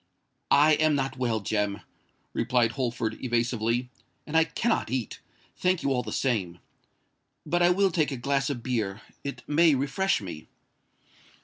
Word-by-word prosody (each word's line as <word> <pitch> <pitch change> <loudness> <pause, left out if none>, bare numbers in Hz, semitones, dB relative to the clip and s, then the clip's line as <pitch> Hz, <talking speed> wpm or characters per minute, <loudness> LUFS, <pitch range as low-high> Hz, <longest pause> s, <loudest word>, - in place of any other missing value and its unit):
"I 150 +2 +6
am 155 -1 +3
not 135 -1 -2
well, 115 -4 0
Jem," 105 0 -1 0.5
replied 120 -2 +2
Holford, 120 -3 -3
evasively; 120 0 0 0.3
"and 155 - -6
I 160 0 +6
cannot 230 - -1
eat—thank 145 - -3
you 140 - +1
all 125 - +1
the 110 -3 -7
same. 100 -11 -1 0.9
But 175 0 0
I 175 - +6
will 195 +1 +3
take 160 -3 +1
a 135 - -3
glass 135 +3 0
of 125 -5 -4
beer: 110 -5 -2 0.2
it 140 - -6
may 155 0 +4
refresh 145 +9 +1
me." 90 -7 -8
130 Hz, 145 wpm, -27 LUFS, 115-150 Hz, 0.9 s, I